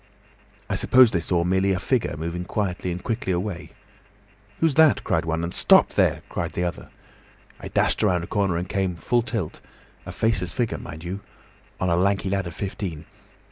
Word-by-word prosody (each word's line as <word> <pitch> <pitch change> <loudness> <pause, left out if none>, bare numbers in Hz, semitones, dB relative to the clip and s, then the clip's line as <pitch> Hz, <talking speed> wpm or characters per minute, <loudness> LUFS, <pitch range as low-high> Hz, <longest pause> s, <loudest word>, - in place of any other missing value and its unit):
I - - -2
suppose 125 -3 +5
they 85 - +1
saw 85 +1 0
merely 95 +2 +2
a 90 - -1
figure 115 - 0
moving 85 +3 -4
quietly 90 -1 -2
and 90 +1 -5
quickly 110 -4 -2
away. 90 0 -3 0.9
'Who's 165 -3 +3
that?' 160 +1 +5
cried 80 - 0
one, 80 +1 -1
and 85 - -3
'Stop - - +5
there!' - - +1
shouted - - -3
the 90 - -1
other. 85 - -4 0.7
I - - -7
dashed - - +1
around 90 -2 +2
a - - -4
corner 100 -3 0
and 90 +2 -3
came 95 -2 -1
full 120 +8 +1
tilt—a 115 -8 -7
faceless 100 -6 0
figure, 120 -3 -1
mind 80 +2 -9
you!—on 95 0 -7
a - - +3
lanky 95 +1 +1
lad 100 -2 -1
of 85 - -8
fifteen. 95 -5 -5
95 Hz, 180 wpm, -24 LUFS, 85-105 Hz, 0.9 s, suppose